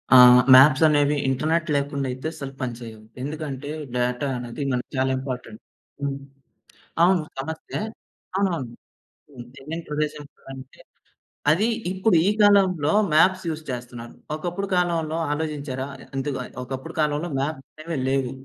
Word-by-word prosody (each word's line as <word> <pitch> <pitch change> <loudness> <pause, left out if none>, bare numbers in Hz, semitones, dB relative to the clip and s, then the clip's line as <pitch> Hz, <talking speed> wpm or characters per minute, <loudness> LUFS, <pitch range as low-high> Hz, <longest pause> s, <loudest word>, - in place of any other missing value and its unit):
ఆ! - - +11 0.4
మ్యాప్స్ 130 +3 +7
అనేవి 145 -1 +3
ఇంటర్నెట్ 155 +5 0
లేకుండా 140 -1 -1
అయితే 130 +4 -5
అసలు 140 -2 -7
పని 125 -2 -2
చేయవు. 110 -2 -10 0.2
ఎందుకంటే, 145 -2 -5 0.3
డేటా 125 +3 0
అనేది 120 +4 -5
మనకి 125 -1 -2
చాలా 130 0 +2
ఇంపార్టెంట్. 125 -4 -6 0.4
హ్మ్. 140 -1 -2 0.9
అవును. 180 -1 +4 0.2
సమస్యే. 160 +8 -5 0.6
అవునవును. 170 -12 -1 0.6
హ్మ్. 125 -4 -10
తెలియని 160 +5 -6
ప్రదేశానికి 150 -1 -3
వెళ్ళాలంటే, 135 0 -12 0.7
అది 195 +8 +2 0.3
ఇప్పుడు 190 0 +2
ఈ - - +5
కాలంలో 190 -7 +4 0.2
మ్యాప్స్ 185 +4 +4
యూజ్ 155 0 -5
చేస్తున్నారు. 120 -1 -7 0.2
ఒకప్పుడు 175 +5 -4
కాలంలో 165 -3 0
ఆలోచించారా? 145 -3 -3 0.3
ఎందుకు, 135 0 -2 0.3
ఒకప్పుడు 130 +1 -6
కాలంలో 150 +3 0
మ్యాప్స్ 140 0 -3 0.2
అనేవే 165 -1 -4
లేవు. 135 -2 0
145 Hz, 125 wpm, -24 LUFS, 130-160 Hz, 0.9 s, ఆ